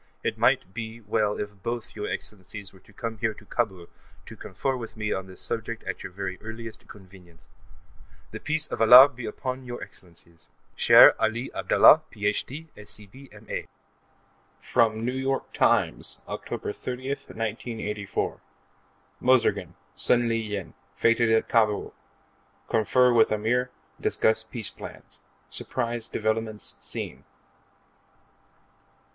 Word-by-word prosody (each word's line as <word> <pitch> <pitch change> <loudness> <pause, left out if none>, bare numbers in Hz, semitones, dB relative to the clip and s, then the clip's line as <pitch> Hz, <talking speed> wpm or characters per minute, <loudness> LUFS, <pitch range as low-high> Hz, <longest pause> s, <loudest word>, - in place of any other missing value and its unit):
It - - -1
might 95 - +2
be 110 +1 -6
well 105 -1 0
if 105 -2 -6
both 120 +2 -4
your 105 -1 -4
Excellencies 100 0 -6
were 95 - -17
to 95 - -21
come 115 +1 -5
here 110 0 0
to 105 - -15
Kabul 95 -7 -2 0.4
to - - -10
confer 135 -1 -3
with 115 -3 -8
me 105 -1 -1
on 95 0 -4
this 95 - -5
subject 115 0 -3
at 95 - -5
your - - -7
very 95 0 -5
earliest 110 0 -8
convenience. 90 -4 -16 0.8
The 110 - -6
Peace 155 +4 0
of - - -5
Allah 125 +5 +10
be 125 -3 -8
upon 130 +4 -4
both 130 - -13
your 120 0 -6
Excellencies! 85 -1 -11 0.3
Shere - - +8
Ali 115 +3 -1
Abdallah, 155 - +6
Ph.D., 120 +9 -3
Sc.B., 105 +6 -8
M.A. 105 +1 -6 0.9
From 115 -1 +1
N. 130 +1 -2
Y. 135 0 +1
Times, - - +1
Oct. - - -7 0.3
30, 130 +1 -5
1984: 110 -5 -4 0.8
MOUZORGIN, 130 -2 +2 0.2
SUN 120 -1 +2
LI 115 - +1
YIN, 105 -7 -4 0.2
FETED 115 0 +3
AT 110 0 +3
KABUL 110 -3 +1 0.7
Confer 125 +3 +3
With 115 -2 +5
Ameer; 120 +4 +1 0.3
Discuss 110 0 +1
Peace 110 -1 -3
Plans - - -11 0.3
Surprise 120 -1 -3
Developments 110 0 -2
Seen.... 65 +1 -6
110 Hz, 130 wpm, -26 LUFS, 105-120 Hz, 0.9 s, Allah